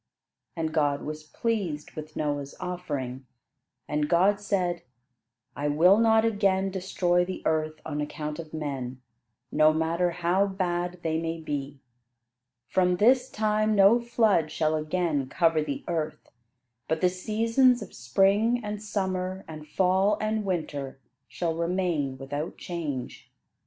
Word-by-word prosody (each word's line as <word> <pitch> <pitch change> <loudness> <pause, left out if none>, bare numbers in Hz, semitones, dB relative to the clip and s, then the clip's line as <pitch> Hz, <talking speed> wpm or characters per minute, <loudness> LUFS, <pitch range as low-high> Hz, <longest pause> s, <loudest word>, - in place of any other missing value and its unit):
And 160 -2 -2
God 145 -3 +1
was 155 0 -5
pleased 180 -5 -2
with 155 0 -9
Noah's 145 -2 -2
offering, 140 -8 -4 0.6
and 150 0 -1
God 190 +4 +4
said: 180 -4 0 0.7
"I 145 - -2
will 175 +8 +5
not 225 -1 +4
again 195 -3 +1
destroy 180 -2 +1
the 185 +1 -5
earth 155 0 0
on 150 -1 -3
account 150 +1 -4
of 160 -2 -8
men, 135 -5 -4 0.5
no 155 +1 +5
matter 165 +3 +1
how 180 +3 +1
bad 180 -2 -2
they 160 0 0
may 165 0 -3
be. 145 -3 -5 0.9
From 180 +3 +2
this 250 +5 +4
time 215 0 +1
no 200 +4 +6
flood 220 -9 +2
shall 155 -1 +1
again 155 -3 -1
cover 165 0 +2
the 145 -2 -4
earth; 160 -3 -3 0.6
but 160 0 -1
the 180 - +5
seasons 230 +6 +2
of 200 - -13
spring 200 - +2
and 210 0 -4
summer 190 -2 -2
and 155 -1 -9
fall 190 +5 +2
and 215 0 -1
winter, 150 -8 -3 0.3
shall 170 -2 -2
remain 170 -5 -1
without 145 +4 -5
change. 150 -8 -5
175 Hz, 135 wpm, -27 LUFS, 155-195 Hz, 0.9 s, no